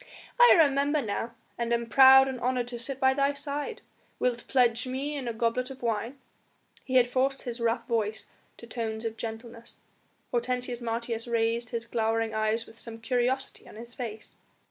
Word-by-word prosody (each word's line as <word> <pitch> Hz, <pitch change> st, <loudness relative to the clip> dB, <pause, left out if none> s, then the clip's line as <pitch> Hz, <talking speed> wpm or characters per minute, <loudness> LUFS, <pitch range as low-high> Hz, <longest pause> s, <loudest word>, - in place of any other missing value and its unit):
"I 485 Hz, 0 st, +9 dB
remember 290 Hz, -1 st, +3 dB
now 230 Hz, -1 st, -3 dB, 0.2 s
and 235 Hz, 0 st, -1 dB
am 235 Hz, 0 st, +1 dB
proud 265 Hz, +2 st, +8 dB
and 260 Hz, -2 st, -4 dB
honoured 250 Hz, 0 st, 0 dB
to 240 Hz, -1 st, -6 dB
sit 265 Hz, +3 st, -4 dB
by 265 Hz, -1 st, +4 dB
thy 280 Hz, +1 st, +1 dB
side; 290 Hz, +9 st, -4 dB, 0.4 s
wilt 240 Hz, -1 st, -1 dB
pledge 245 Hz, -1 st, +2 dB
me 275 Hz, +4 st, -3 dB
in 270 Hz, -4 st, -4 dB
a -, -, 0 dB
goblet 230 Hz, +3 st, -1 dB
of 265 Hz, -2 st, -10 dB
wine?" 230 Hz, +3 st, -2 dB, 0.7 s
He 260 Hz, -, -4 dB
had 250 Hz, -1 st, +6 dB
forced 265 Hz, +2 st, 0 dB
his 240 Hz, -2 st, -5 dB
rough 230 Hz, 0 st, 0 dB
voice 220 Hz, -2 st, -1 dB, 0.3 s
to -, -, -11 dB
tones 225 Hz, -1 st, -4 dB
of 225 Hz, -1 st, -3 dB
gentleness. 230 Hz, +1 st, -8 dB, 0.5 s
Hortensius 245 Hz, 0 st, -2 dB
Martius 230 Hz, 0 st, -3 dB
raised 230 Hz, 0 st, 0 dB
his 230 Hz, 0 st, -3 dB
glowering 225 Hz, -1 st, -1 dB
eyes 220 Hz, +1 st, 0 dB
with 225 Hz, -, -10 dB
some 230 Hz, -1 st, -5 dB
curiosity 250 Hz, +3 st, -1 dB
on -, -, -13 dB
his 235 Hz, +2 st, -10 dB
face. 225 Hz, -5 st, -7 dB
240 Hz, 175 wpm, -28 LUFS, 230-260 Hz, 0.7 s, I